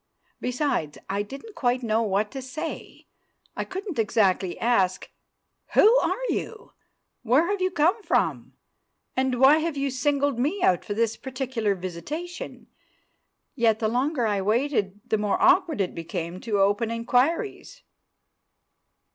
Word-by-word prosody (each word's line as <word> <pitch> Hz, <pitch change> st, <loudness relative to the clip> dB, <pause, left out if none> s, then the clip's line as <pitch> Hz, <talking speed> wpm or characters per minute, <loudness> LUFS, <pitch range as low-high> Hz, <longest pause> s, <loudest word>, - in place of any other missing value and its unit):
Besides, 250 Hz, -, -1 dB
I 200 Hz, +1 st, 0 dB
didn't 275 Hz, -, -9 dB
quite 245 Hz, -4 st, 0 dB
know 225 Hz, 0 st, +1 dB
what 210 Hz, -1 st, 0 dB
to 270 Hz, -, -6 dB
say. 285 Hz, +6 st, -7 dB, 0.5 s
I -, -, -2 dB
couldn't 380 Hz, -, -5 dB
exactly 195 Hz, -4 st, +1 dB
ask, 195 Hz, -6 st, +1 dB, 0.6 s
"Who 445 Hz, +4 st, +7 dB
are -, -, 0 dB
you? 450 Hz, -1 st, -4 dB, 0.5 s
where 255 Hz, +7 st, +3 dB
have 405 Hz, -2 st, -2 dB
you 370 Hz, -, +2 dB
come 360 Hz, +5 st, +2 dB
from? -, -, 0 dB, 0.6 s
and 260 Hz, -1 st, 0 dB
why 275 Hz, +4 st, +7 dB
have 320 Hz, -2 st, -2 dB
you 275 Hz, 0 st, -1 dB
singled 280 Hz, 0 st, 0 dB
me 315 Hz, +10 st, 0 dB
out 180 Hz, -, +3 dB
for 205 Hz, -, -4 dB
this 225 Hz, 0 st, 0 dB
particular 255 Hz, -5 st, -2 dB
visitation?" 290 Hz, -, -6 dB, 0.9 s
Yet 230 Hz, -4 st, +2 dB
the 220 Hz, -1 st, 0 dB
longer 250 Hz, +3 st, 0 dB
I 205 Hz, -2 st, 0 dB
waited, 210 Hz, -2 st, 0 dB
the 220 Hz, -3 st, 0 dB
more 210 Hz, -1 st, 0 dB
awkward 360 Hz, -, +4 dB
it 190 Hz, -2 st, 0 dB
became 170 Hz, +1 st, -5 dB
to 220 Hz, -3 st, -1 dB
open 205 Hz, +4 st, +2 dB
inquiries. 275 Hz, -, -1 dB
245 Hz, 140 wpm, -25 LUFS, 210-300 Hz, 0.9 s, Who